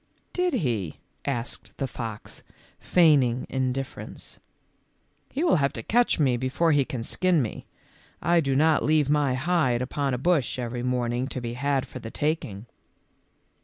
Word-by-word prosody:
"Did 360 -4 +1
he?" 115 - -1 0.3
asked 120 -4 -4
the 135 - -1
fox, 115 -5 -6 0.4
feigning 140 -8 +4
indiffer 130 0 -2
ence; - - -8 0.5
" - - -43
he 290 - -1
will 335 - +4
have 140 -2 +1
to 115 - -5
catch 240 - +3
me 130 -5 +2
before 130 +7 +1
he 145 -2 +4
can 125 -3 -5
skin 180 +5 +2
me. 120 -6 -3 0.5
I 170 +1 +3
do 135 -4 +1
not 155 +3 +4
leave 150 -2 +3
my 145 -3 +2
hide 145 -4 +1
upon 135 +1 -1
a - - -2
bush 145 -2 +1
every 120 -1 -3
morning 125 0 0
to 130 - -4
be 120 -1 -4
had 135 +1 0
for 130 - -8
the 115 - -7
taking. 120 -8 -2
135 Hz, 165 wpm, -26 LUFS, 120-155 Hz, 0.5 s, feigning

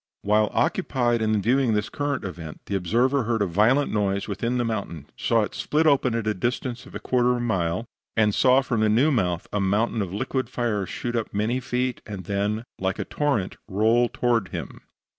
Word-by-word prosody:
While 105 +1 +3
occupied 120 -3 +1
in 110 -2 +1
viewing 125 0 +2
this 105 0 0
current, 145 -2 -2
the 85 +1 -6
observer 120 +9 +2
heard 115 -2 +1
a - - +1
violent 110 +11 +2
noise 100 -2 0
within 115 +5 -1
the 120 - 0
mountain; 100 -9 -4
saw 115 -2 +2
it - - -5
split 155 +2 0
open 135 -5 +3
at 115 - -1
the 110 0 0
distance 120 +4 -3
of - - -13
a - - -3
quarter 125 -1 +1
of - - -1
a - - -3
mile, 95 -3 -1 0.3
and 105 -2 +3
saw 130 +4 +5
from 120 -4 -1
the 110 - +3
new 125 +9 +4
mouth 90 - 0
a 105 - +1
mountain 105 +4 +1
of 95 -3 -3
liquid 130 +6 -2
fire 105 -6 -1
shoot 120 0 -4
up 115 -2 -2
many 110 +5 0
feet, 125 0 -2
and 100 -3 -6
then, 100 +4 -1 0.2
like 95 0 -1
a - - -3
torrent, 140 -11 -1
roll 110 +5 +3
on - - -4
toward 120 -5 +1
him. - - -7
110 Hz, 205 wpm, -25 LUFS, 100-125 Hz, 0.3 s, saw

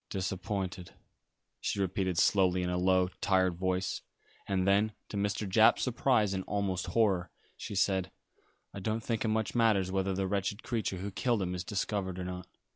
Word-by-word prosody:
"Disappointed," 95 -1 -3 0.7
she - - -2
repeated 95 -2 -1
slowly 90 -1 +3
in 90 - -1
a 90 - 0
low, 95 0 +3
tired 95 -2 +3
voice, 95 +1 -1 0.5
and 95 -1 0
then, 105 +2 +3 0.2
to - - -7
Mr. 100 +1 -1
Japp's 110 +4 +5
surprise 120 -5 +2
and 95 -1 -2
almost 100 -3 -1
horror, 95 -6 +3 0.3
she 105 - -7
said, 95 -1 +1 0.6
"I 100 - -6
don't 110 +3 -2
think 115 -2 -1
it - - 0
much 110 0 0
matters 110 -6 +3
whether 95 0 0
the 95 0 0
wretched 100 +2 -2
creature 110 -5 -2
who 100 +3 -5
killed 115 0 0
him 90 0 -2
is 90 -1 -3
discovered 95 -2 -2
or 95 - -4
not. 90 0 -6
95 Hz, 175 wpm, -31 LUFS, 95-105 Hz, 0.7 s, Japp's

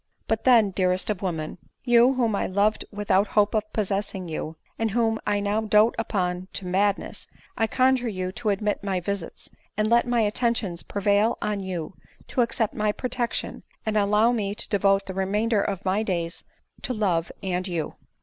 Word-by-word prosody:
But 225 -1 -1
then, 230 -6 +6
dearest 185 +1 +1
of 195 - -4
women, 165 -3 -3 0.3
you 240 +2 +5
whom 230 -4 +1
I - - -1
loved 205 +3 +1
without 205 -1 +1
hope 210 -1 +2
of 215 -1 -1
possessing 195 -3 -2
you, 160 0 -5 0.2
and 225 0 +1
whom 225 0 +1
now 205 +1 +1
I - - -5
dote 210 +2 +5
upon 185 -4 -1
to 195 - -3
madness, 195 +2 -1 0.3
I 225 - +1
conjure 255 +1 +2
you 185 -3 -3
to 215 +3 -2
admit 205 +1 -1
my 195 -2 0
visits, 190 -1 -5 0.3
and 215 0 +2
let 235 +2 +3
my 240 -1 +2
attentions 210 -4 0
prevail 205 +2 +1
on 210 -1 -2
you 185 -3 -4 0.4
to 255 - +1
accept 230 -2 0
my 210 0 +1
protection, 245 +1 -2 0.2
and 220 -1 -1
allow 210 +3 +4
me 205 -4 -1
to - - 0
devote 195 -1 +2
the 190 - -6
remainder 205 +3 +1
of 195 -2 -3
my 190 +3 +1
days 170 -5 -3 0.4
to 255 - -3
love 175 -6 0
and 185 0 -1
you 170 -4 -3
205 Hz, 180 wpm, -25 LUFS, 190-220 Hz, 0.4 s, then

